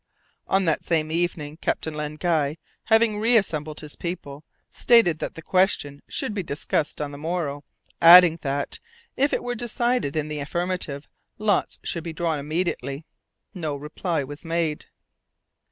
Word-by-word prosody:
On 195 0 +2
that 160 - +1
same 155 -2 0
evening 160 -3 -2
Captain 160 -1 -2
Len 150 0 -4
Guy, 155 -3 0 0.3
having 220 -2 +3
reassembled 185 -10 +1
his 150 -2 -9
people, 160 -5 -6 0.3
stated 190 -10 +4
that - - -4
the 165 - -9
question 185 -7 +1
should - - -2
be 205 - -2
discussed 150 -1 -2
on 145 -1 -3
the 140 - -9
morrow, 155 -3 -3 0.4
adding 170 -1 +9
that, 140 0 -3 0.4
if 280 +2 +2
it - - -1
were 245 0 -2
decided 240 - -1
in 155 -1 -1
the 150 -1 -4
affirmative, 160 -1 -3 0.3
lots 210 -1 +1
should 170 - -3
be 165 -1 -5
drawn 160 -1 -1
immediately. 155 -1 -3 0.5
No 160 -6 -3
reply 150 +2 -2
was 145 +3 -9
made. 165 -2 -1
160 Hz, 150 wpm, -24 LUFS, 150-185 Hz, 0.5 s, adding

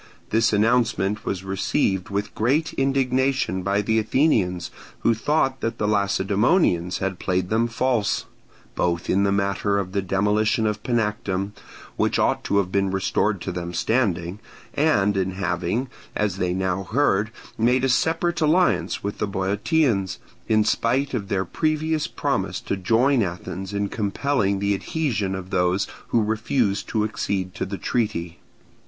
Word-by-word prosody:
This 115 +1 +3
announcement 110 -2 +1
was 95 -1 -2
received 95 -1 0
with 100 +1 -3
great 140 +9 +1
indignation 130 -6 +1
by 100 +2 0
the 110 +2 +2
Athenians, 105 - +1 0.3
who 115 - +3
thought 135 +3 0
that 115 - -2
the 105 - 0
Lacedaemonians 100 - +2
had 95 -1 -3
played 90 0 -1
them 115 +2 +2
false, 120 -2 0 0.5
both 85 -1 -1
in 100 - +3
the 100 - +2
matter 100 0 +1
of 95 -2 -2
the 100 0 0
demolition 105 +4 +1
of 105 -1 -1
Panactum, 105 -5 -1 0.5
which - - +1
ought - - +1
to 100 - +1
have 95 -2 +1
been 100 0 +1
restored 95 +2 0
to 95 - -3
them 85 -1 -5
standing, 95 -3 0 0.3
and 105 -10 +2
in 95 -1 0
having, 95 +6 -1 0.3
as 105 -3 0
they 90 -1 0
now 95 0 -1
heard, 110 -2 +1 0.3
made 125 +3 +2
a - - +3
separate 165 +6 +1
alliance 170 +4 +2
with 100 +1 -4
the 105 - 0
Boeotians, 100 - 0 0.3
in 110 -1 +4
spite 130 +6 +1
of 105 -5 -2
their 95 -1 0
previous 155 - 0
promise - - -2
to - - -3
join 115 +7 +2
Athens 95 0 -4
in 100 0 -1
compelling 105 0 0
the 100 +1 +1
adhesion 105 -4 -1
of 95 0 -7
those 90 +2 +2 0.2
who 115 - +2
refused 110 -1 0
to 110 -2 0
accede 100 -3 -2
to - - -3
the 100 0 -4
treaty. 85 -9 -2
105 Hz, 150 wpm, -23 LUFS, 95-120 Hz, 0.5 s, in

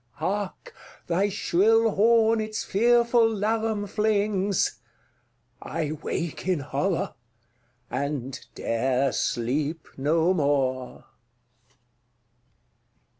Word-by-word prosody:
Hark, 200 0 -4 0.3
thy 185 +4 +1
shrill 220 +4 +3
horn 225 +1 +4
its 215 0 -3
fearful 235 +2 +3
laram 220 0 -1
flings! 205 -2 0 0.8
—I 155 -2 -3
wake 170 +1 -4
in 180 -6 +1
horror, 160 +7 -1 0.7
and 135 -3 -4
'dare 130 +3 0
sleep 140 +7 -1
no 160 +6 +2
more! 135 -5 -1
190 Hz, 75 wpm, -26 LUFS, 145-215 Hz, 0.8 s, horn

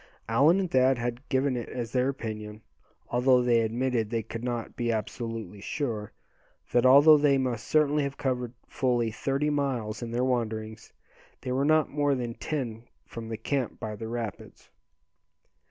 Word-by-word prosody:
Allan 140 - +4
and 185 -3 -2
Thad 130 0 +4
had 120 +3 -4
given 130 -1 +1
it 120 - -4
as 120 -2 -5
their 130 +1 +2
opinion, 110 -4 -6 0.5
although 125 +1 +4
they 120 -1 +4
admitted 115 0 0
they 115 -1 -1
could 115 +3 -7
not 120 -2 -3
be 120 -1 0
absolutely 110 -1 -4
sure, 110 -5 -3 0.6
that 120 +1 +4
although 145 +3 +8
they 145 -2 +4
must 125 -4 -2
certainly 150 -1 +3
have 140 0 -3
covered 125 -3 -2
fully 120 -3 0
thirty 140 +6 -1
miles 125 -7 -2
in 120 - -4
their 120 +2 -1
wanderings, 110 -3 -3 0.5
they 125 - -4
were 135 +2 +1
not 155 0 +3
more 145 -1 +1
than 120 -2 -3
ten 120 -6 -4 0.2
from 115 -1 -8
the 110 - -4
camp 130 +2 -2
by 110 -1 -4
the 110 +2 -6
rapids. 115 -4 -6
120 Hz, 165 wpm, -28 LUFS, 115-135 Hz, 0.6 s, although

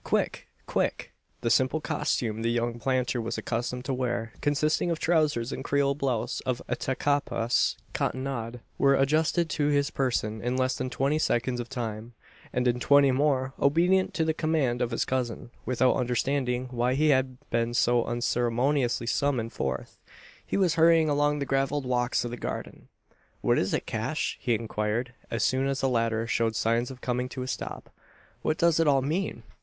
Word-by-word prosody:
Quick! - - -1 0.2
Quick!" - - -2 0.3
The 115 -1 0
simple 130 +6 +3
costume 115 -7 -1
the 115 - +1
young 120 0 -1
planter 130 -1 0
was 115 +1 -3
accustomed 125 +2 -3
to 135 - -1
wear, 120 -3 -2
consisting 150 +4 +1
of 165 - 0
trousers 150 -8 +1
and - - -5
Creole 140 -1 +2
blouse 135 -5 -1
of 130 -2 -2
Attakapas 130 -3 0 0.2
cottonade, 125 -3 -3 0.2
were 140 0 +5
adjusted 155 +5 +2
to 145 -2 +1
his 145 -1 +2
person 110 -5 -1
in 125 +1 -1
less 130 0 +1
than 130 - -3
twenty 140 +4 0
seconds 125 -3 0
of 120 - -5
time; 115 -2 -5 0.4
and 125 0 0
in 125 0 +1
twenty 140 +1 +5
more, 135 -1 +1
obedient 175 +6 +3
to 160 - +1
the 160 - +1
command 155 -7 0
of 120 - +1
his 115 - -1
cousin 120 -2 -3 0.2
without 130 0 +3
understanding 125 0 0
why 125 +1 +1
he 155 +2 +3
had 130 -2 +2
been 115 0 +1
so 120 0 +3
unceremoniously 120 +2 0
summoned 120 -1 0
forth 65 -1 -4 0.4
he - - -2
was 185 -4 +3
hurrying 165 -1 +5
along 145 0 +2
the 140 - -2
gravelled 135 +1 0
walks 125 -1 0
of 120 - -4
the 120 - -5
garden. - - -6 0.5
"What - - +3
is - - 0
it, - - -1
Cash?" - - -2
he 120 - +1
inquired, 110 +2 -2 0.2
as 115 - -1
soon 130 +1 +2
as 135 -1 -1
the 135 - +2
latter 115 -2 0
showed 115 -1 0
signs 115 +2 +1
of 130 -1 -10
coming 125 0 -1
to 130 0 -5
a - - -6
stop. - - -5 0.5
"What 155 - 0
does 170 -1 +3
it 165 - +3
all 135 -2 +4
mean?" 170 +8 -2
130 Hz, 175 wpm, -27 LUFS, 120-140 Hz, 0.5 s, were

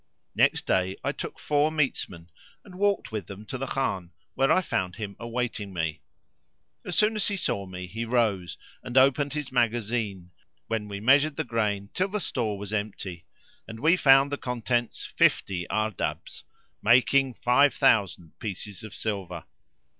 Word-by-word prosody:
Next - - +2
day 95 +1 +1
I - - 0
took - - -7
four 150 +1 +1
metesmen 100 - -2 0.3
and 195 - -13
walked 200 -8 +1
with 105 -5 -4
them 100 +2 -9
to 130 - -5
the 135 - -3
Khan, 95 -11 -2 0.2
where 135 0 +2
I 185 - +4
found 90 - -2
him 105 -3 -6
awaiting 115 -3 -3
me. 80 -4 -2 0.8
As 180 - -4
soon 215 +1 +3
as 210 - +1
he 205 - -1
saw 100 - -2
me 90 0 -7
he 110 +6 -5
rose 110 -7 0 0.2
and 125 +1 -4
opened 140 +2 +4
his 150 -3 -4
magazine, 110 -6 -1 0.3
when 110 -2 -2
we 100 -1 -5
measured 140 +7 +4
the 160 - -1
grain 105 -5 -1
till 185 - +1
the 210 +2 -2
store 115 - -2
was 100 +1 -5
empty; 100 -5 -4 0.4
and 110 0 -8
we 160 +6 +4
found 135 -4 +5
the 145 - -1
contents 120 -2 -2
fifty 90 -3 +1
Ardabbs, 110 -1 -3 0.4
making 130 +2 +4
five 140 +3 +4
thousand 90 -4 +2
pieces 105 -1 -4
of 110 - -9
silver. 95 -6 -4
115 Hz, 160 wpm, -27 LUFS, 100-135 Hz, 0.8 s, found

